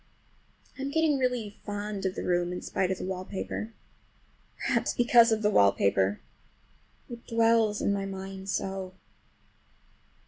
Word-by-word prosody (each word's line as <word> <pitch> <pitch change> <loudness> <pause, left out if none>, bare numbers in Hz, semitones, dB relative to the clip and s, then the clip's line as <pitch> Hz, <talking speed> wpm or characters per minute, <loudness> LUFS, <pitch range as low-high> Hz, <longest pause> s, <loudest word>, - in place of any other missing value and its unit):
I'm 275 +1 -2
getting 310 -1 +2
really 245 -5 -2
fond 205 -1 -3
of 185 - -4
the - - -4
room 175 0 0
in 180 - -5
spite 185 - -1
of 190 - -1
the - - -6
wallpaper. 190 +4 -5 0.9
Perhaps - - 0
because 240 -1 +5
of 220 0 0
the 210 - +3
wallpaper. 100 - +3 0.9
It 235 -1 -10
dwells 225 -2 +2
in 200 - +2
my 195 -1 -2
mind 190 0 -7
so! 190 -1 -3
200 Hz, 135 wpm, -28 LUFS, 185-230 Hz, 0.9 s, because